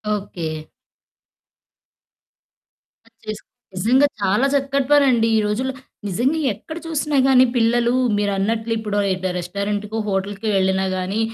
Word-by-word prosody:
Okay. 160 Hz, -6 st, -5 dB, 2.4 s
ఆహ్, 230 Hz, -, -24 dB
chess 215 Hz, 0 st, -5 dB, 0.3 s
నిజంగా 250 Hz, +10 st, +3 dB
చాలా 205 Hz, +7 st, +2 dB
చక్కటి 275 Hz, -1 st, 0 dB
పనండి 260 Hz, -6 st, +4 dB
ఈ -, -, +4 dB
రోజుల్లో. 250 Hz, +6 st, -1 dB, 0.3 s
నిజంగా 245 Hz, -, 0 dB
ఎక్కడ 315 Hz, -, -9 dB
చూసినా 300 Hz, -2 st, -1 dB
గాని 260 Hz, -1 st, +6 dB
పిల్లలు 240 Hz, +1 st, +2 dB, 0.2 s
మీరన్నట్లు 210 Hz, +3 st, -1 dB
ఇప్పుడో 210 Hz, -2 st, -2 dB, 0.2 s
డు 185 Hz, -, 0 dB
రెస్టారెంట్‌కో 205 Hz, +4 st, -3 dB
హోటల్‌కో 200 Hz, +2 st, -2 dB
వెళ్ళినా 190 Hz, 0 st, +1 dB
గాని 185 Hz, +3 st, -2 dB
215 Hz, 110 wpm, -21 LUFS, 195-255 Hz, 2.4 s, గాని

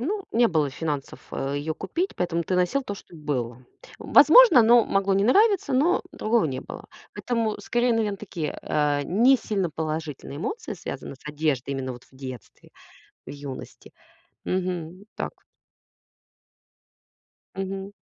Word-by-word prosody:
ну, 390 Hz, -, -2 dB
не 235 Hz, +1 st, +4 dB
было 155 Hz, -5 st, +1 dB
финансов, 145 Hz, 0 st, -4 dB
а, 135 Hz, +1 st, -3 dB
её 150 Hz, +2 st, -2 dB
купить, 335 Hz, -, -3 dB
поэтому 170 Hz, -1 st, -1 dB
ты 185 Hz, -, -2 dB
носил 180 Hz, +10 st, +1 dB
то, 205 Hz, -, -5 dB
что 195 Hz, -, -14 dB
было. 130 Hz, -6 st, -4 dB, 0.4 s
Возможно, 320 Hz, -, +7 dB
оно 235 Hz, +1 st, +6 dB
могло 195 Hz, 0 st, +1 dB
не 195 Hz, +1 st, +2 dB
нравиться, 395 Hz, -, +3 dB
но 310 Hz, +8 st, +3 dB
другого 225 Hz, +1 st, +1 dB
не 130 Hz, -3 st, -4 dB
было. -, -, -10 dB, 0.3 s
Поэтому 230 Hz, -3 st, -1 dB
скорее, 240 Hz, 0 st, +1 dB
наверное, 215 Hz, -3 st, 0 dB
такие, 170 Hz, -7 st, -5 dB
а, 145 Hz, -1 st, +1 dB
не 235 Hz, -, +4 dB
сильно 200 Hz, -6 st, -2 dB
положительные 155 Hz, -2 st, -5 dB
эмоции, 440 Hz, -, -4 dB
связанные -, -, -7 dB
с 135 Hz, -, -18 dB
одеждой 150 Hz, -3 st, -1 dB
именно 135 Hz, -1 st, -3 dB
вот 125 Hz, 0 st, -12 dB
в -, -, -26 dB
детстве, 130 Hz, -6 st, -10 dB, 0.6 s
в -, -, -8 dB
юности. 140 Hz, -2 st, -9 dB, 0.5 s
Мгм, 180 Hz, 0 st, -3 dB
так. -, -, -3 dB, 2.2 s
Мгм. 195 Hz, +1 st, -4 dB
180 Hz, 145 wpm, -25 LUFS, 145-230 Hz, 2.2 s, Возможно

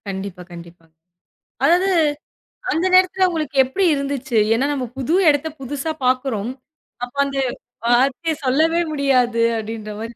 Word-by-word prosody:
கண்டிப்பா. 190 Hz, -2 st, -6 dB
கண்டிப்பா. 170 Hz, -1 st, -12 dB, 0.8 s
அதாவது, 350 Hz, +6 st, +4 dB, 0.8 s
அந்த 325 Hz, +4 st, 0 dB
நேரத்துல 370 Hz, 0 st, +4 dB
உங்களுக்கு 310 Hz, -5 st, -4 dB
எப்படி 370 Hz, +10 st, -1 dB
இருந்துச்சு? 275 Hz, -3 st, -2 dB, 0.2 s
ஏன்னா 255 Hz, +4 st, +1 dB
நம்ம 265 Hz, -3 st, -2 dB
புது 270 Hz, +6 st, 0 dB
இடத்த 290 Hz, +1 st, +1 dB
புதுசா 285 Hz, +4 st, -3 dB
பாக்குறோம். 255 Hz, -4 st, 0 dB, 0.5 s
அப்போ 245 Hz, +3 st, -7 dB
அந்த 275 Hz, 0 st, -4 dB, 0.5 s
வார்த்தைய 265 Hz, +7 st, +2 dB
சொல்லவே 320 Hz, +6 st, +2 dB
முடியாது, 255 Hz, -5 st, +2 dB, 0.2 s
அப்படின்ற 220 Hz, -1 st, -6 dB
மாதிரி 230 Hz, +1 st, -7 dB
265 Hz, 125 wpm, -20 LUFS, 230-310 Hz, 0.8 s, அதாவது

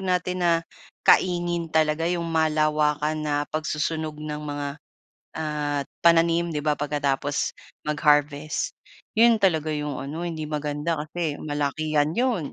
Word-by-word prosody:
natin 180 Hz, -1 st, -1 dB
na 175 Hz, -1 st, +4 dB, 0.5 s
kaingin 175 Hz, -2 st, +3 dB
talaga, 160 Hz, +1 st, +2 dB
yung 175 Hz, -1 st, -1 dB
malawakan 155 Hz, -1 st, +2 dB
na 150 Hz, -1 st, -1 dB, 0.2 s
pagsusunog 155 Hz, 0 st, -2 dB
ng 150 Hz, 0 st, -5 dB
mga 145 Hz, -1 st, -4 dB, 0.7 s
ah, 150 Hz, -2 st, -1 dB, 0.2 s
pananim, 170 Hz, 0 st, +4 dB
di 150 Hz, -, -1 dB
ba, 150 Hz, 0 st, +1 dB
pagkatapos 145 Hz, -1 st, -1 dB, 0.3 s
mag-harvest, 150 Hz, -, +1 dB, 0.4 s
'yon 230 Hz, -1 st, +6 dB
talaga 160 Hz, -6 st, +2 dB
yung 150 Hz, -2 st, -3 dB
ano, 145 Hz, +5 st, -5 dB
hindi 165 Hz, -3 st, -3 dB
maganda 150 Hz, +1 st, -2 dB
kasi 155 Hz, 0 st, -3 dB
malakihan 150 Hz, +1 st, 0 dB
'yon, 230 Hz, -, 0 dB
155 Hz, 120 wpm, -25 LUFS, 150-170 Hz, 0.7 s, yon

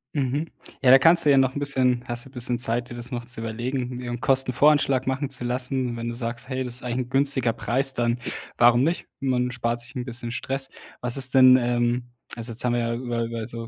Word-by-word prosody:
Mhm. 140 Hz, +3 st, -1 dB, 0.3 s
Ja, 130 Hz, -2 st, +5 dB
da 135 Hz, -, +10 dB
kannst 170 Hz, +4 st, +5 dB
du -, -, +4 dB
ja 140 Hz, -, +6 dB
noch 130 Hz, 0 st, +3 dB
'n -, -, -2 dB
bisschen 130 Hz, -3 st, +1 dB
hast 120 Hz, 0 st, -4 dB
du -, -, -13 dB
bisschen 125 Hz, -2 st, -3 dB
Zeit, 120 Hz, +1 st, 0 dB
dir 120 Hz, -, -8 dB
das 120 Hz, +2 st, -4 dB
noch 120 Hz, -1 st, -4 dB
zu 120 Hz, -2 st, -6 dB
überlegen, 120 Hz, +3 st, -3 dB
dir 125 Hz, -1 st, -6 dB
'n 120 Hz, +1 st, -5 dB
Kostenvoranschlag 135 Hz, 0 st, +2 dB
machen 135 Hz, +1 st, -1 dB
zu 135 Hz, -3 st, -4 dB
lassen. 125 Hz, 0 st, -1 dB
Wenn 115 Hz, 0 st, -4 dB
du 120 Hz, -, -3 dB
sagst: 120 Hz, +1 st, -4 dB
„Hey, 130 Hz, 0 st, -2 dB
das 125 Hz, -2 st, -5 dB
ist 125 Hz, -, -5 dB
eigentlich 125 Hz, 0 st, -2 dB
'n -, -, -20 dB
günstiger 135 Hz, -2 st, +2 dB
Preis“, 135 Hz, +4 st, 0 dB
dann 120 Hz, -1 st, 0 dB, 0.4 s
warum 120 Hz, +1 st, +5 dB
nicht? 165 Hz, +4 st, -1 dB
Man 125 Hz, -2 st, 0 dB
spart 120 Hz, 0 st, -2 dB
sich 120 Hz, +2 st, -12 dB
'n 125 Hz, -3 st, -4 dB
bisschen 120 Hz, -1 st, -5 dB
Stress. 135 Hz, +3 st, -3 dB, 0.3 s
Was 120 Hz, +1 st, +1 dB
ist 130 Hz, 0 st, +3 dB
denn, 130 Hz, -1 st, +8 dB
ähm 120 Hz, 0 st, -1 dB, 0.2 s
also, 115 Hz, 0 st, -4 dB
jetzt 115 Hz, -, -3 dB
haben 120 Hz, -, +1 dB
wir 120 Hz, -, +1 dB
ja 115 Hz, 0 st, -1 dB
über 120 Hz, -1 st, -3 dB
über 115 Hz, -1 st, -5 dB
so 115 Hz, -1 st, -7 dB
125 Hz, 240 wpm, -24 LUFS, 120-130 Hz, 0.4 s, da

